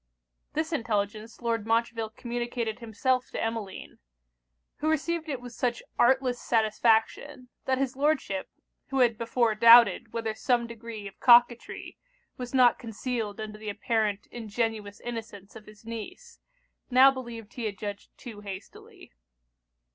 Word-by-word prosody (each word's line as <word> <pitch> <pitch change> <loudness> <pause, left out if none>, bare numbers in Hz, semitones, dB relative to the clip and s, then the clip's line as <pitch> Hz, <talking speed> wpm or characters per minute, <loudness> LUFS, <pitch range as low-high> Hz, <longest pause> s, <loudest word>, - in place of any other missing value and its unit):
This 315 +2 -2
intelligence 215 -3 -2
Lord 230 -2 -1
Montreville 225 -1 0
communicated 240 0 -4
himself 250 +3 -1
to - - -5
Emmeline; 225 -4 -5 0.8
who 310 - -1
received 320 +1 -1
it 270 -4 -2
with 245 -1 -10
such 240 -1 -2 0.2
artless 255 0 +3
satisfaction, 225 +4 +1 0.2
that 260 0 +1
his 270 -1 -1
Lordship, 275 -9 0 0.4
who 270 -1 0
had 235 -2 +4
before 230 0 +1
doubted 230 -1 +7
whether 225 -1 -2
some 240 +1 +1
degree 230 -2 -8
of 195 - -13
coquetry 240 -1 +4 0.4
was 245 -1 -6
not 250 -3 +5
concealed 225 -2 -4
under 215 -1 -6
the 215 -1 -5
apparent 210 -1 -1
ingenuous 220 -2 -3
innocence 225 -4 -7
of 220 -1 -12
his 215 +1 -16
niece, 230 - -8 0.5
now 260 +2 +7
believed 235 -4 -8
he 240 - -5
had 205 -2 -3
judged 205 -1 -6
too 225 -5 -9
hastily. 195 -2 -10
230 Hz, 135 wpm, -28 LUFS, 215-250 Hz, 0.8 s, doubted